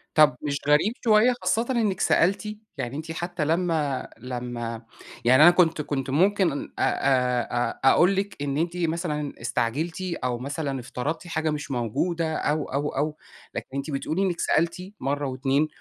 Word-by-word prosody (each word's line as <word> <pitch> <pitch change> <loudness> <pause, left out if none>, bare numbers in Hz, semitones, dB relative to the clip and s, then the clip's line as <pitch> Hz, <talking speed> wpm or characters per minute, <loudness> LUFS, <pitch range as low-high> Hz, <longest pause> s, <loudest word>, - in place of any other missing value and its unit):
طَب 150 -4 +6
مش 145 -1 -1
غريب 150 +9 +4
شوية 225 +2 +5
خاصةً 230 +2 +1
إنِّك 220 -7 +1
سألتِ؟ 205 +4 +2 0.2
يعني 130 -1 -4
أنتِ 160 +1 -6
حتى 175 0 -3
لمّا 160 -4 0
لمّا 120 -1 -5 0.4
يعني 130 +4 +7
أنا 175 - +10
كنت 165 -3 +3
كنت 135 -3 -3
ممكن 175 0 +2 0.2
أ - - 0
أ 125 -2 +1 0.2
أ - - +9
أقول 180 +3 +4
لِك 195 0 -2
إن 140 -1 -1
أنتِ 170 +2 -1
مثلًا 160 -3 -2
استعجلتِ، 145 +10 -1 0.2
أو 125 -1 -1
مثلًا 140 +1 -3
افترضتِ 135 +8 -4
حاجة 160 -2 -1
مش 150 -2 -4
موجودة، 160 - -1
أو، 150 0 0
أو، 145 +2 0
أو 150 +2 -2 0.4
لكن - - -4
أنتِ 140 +3 -3
بتقولي 155 +6 -1
إنِّك 180 -3 0
سألتِ 170 +1 +2 0.2
مرّه 145 +2 -1
و2 135 +3 +1
150 Hz, 160 wpm, -25 LUFS, 135-175 Hz, 0.4 s, أنا